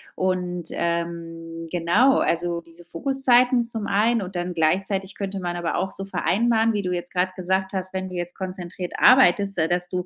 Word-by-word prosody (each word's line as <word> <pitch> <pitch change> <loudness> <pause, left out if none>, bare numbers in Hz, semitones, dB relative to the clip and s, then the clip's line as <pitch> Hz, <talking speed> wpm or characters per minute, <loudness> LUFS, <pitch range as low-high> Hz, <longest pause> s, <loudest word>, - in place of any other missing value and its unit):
Und, 180 -2 -1
ähm, 165 -1 -4
genau, 180 +10 +3
also 170 0 0
diese 170 +1 -18
Fokuszeiten 250 +4 +2
zum 225 -3 -4
einen 220 +3 +2
und 185 +1 -8
dann 175 0 -2
gleichzeitig 190 +4 0
könnte 195 -1 -4
man 175 -1 -3
aber 175 -1 -2
auch 190 - -1
so 195 - -7
vereinbaren, 225 +3 +1
wie 205 - 0
du 180 -2 -3
jetzt 175 0 -4
grad 185 0 0
gesagt 190 +1 -1
hast: 185 -1 -3
Wenn 190 0 -3
du 180 - -8
jetzt 175 0 -4
konzentriert 185 -1 -6
arbeitest, 200 -6 +5
da 160 - +2
dass 175 +1 0
du 180 -1 -3
185 Hz, 185 wpm, -23 LUFS, 175-200 Hz, -, arbeitest